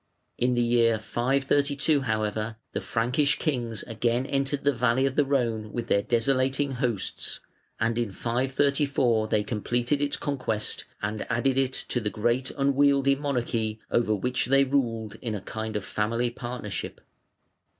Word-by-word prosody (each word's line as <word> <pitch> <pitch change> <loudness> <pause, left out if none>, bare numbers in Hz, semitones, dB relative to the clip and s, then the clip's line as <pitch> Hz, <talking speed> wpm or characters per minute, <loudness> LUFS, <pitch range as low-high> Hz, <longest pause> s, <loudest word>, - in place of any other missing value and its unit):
In 125 0 +2
the 120 - +2
year 115 -1 +3
532, 140 +5 +1
however, 110 -2 -1 0.2
the - - -3
Frankish 125 +5 +1
kings 120 - -2
again 120 +2 0
entered 140 +1 -1
the 145 0 +3
valley 125 +2 +2
of 135 -1 -1
the 150 - +4
Rhone 115 -6 0
with 120 - -4
their 100 - +4
desolating 135 +5 +1
hosts, 125 -6 -2 0.4
and 115 +1 +1
in 115 -4 -1
534 130 0 +1
they 105 -1 +1
completed 120 +5 -1
its 145 0 0
conquest 125 -7 -2 0.2
and 105 +1 -2
added 130 +2 +2
it 130 -1 +1
to 125 - -1
the 105 -3 -1
great 120 +4 0
unwieldy 140 0 +4
monarchy 120 -6 -1
over 115 -2 +2
which 125 +5 -1
they 135 +1 +5
ruled 115 -6 -1
in 115 -3 -3
a 100 - -5
kind 110 +2 -5
of 105 - -2
family 115 +3 0
partnership. 120 -5 -5
120 Hz, 150 wpm, -27 LUFS, 110-135 Hz, 0.4 s, they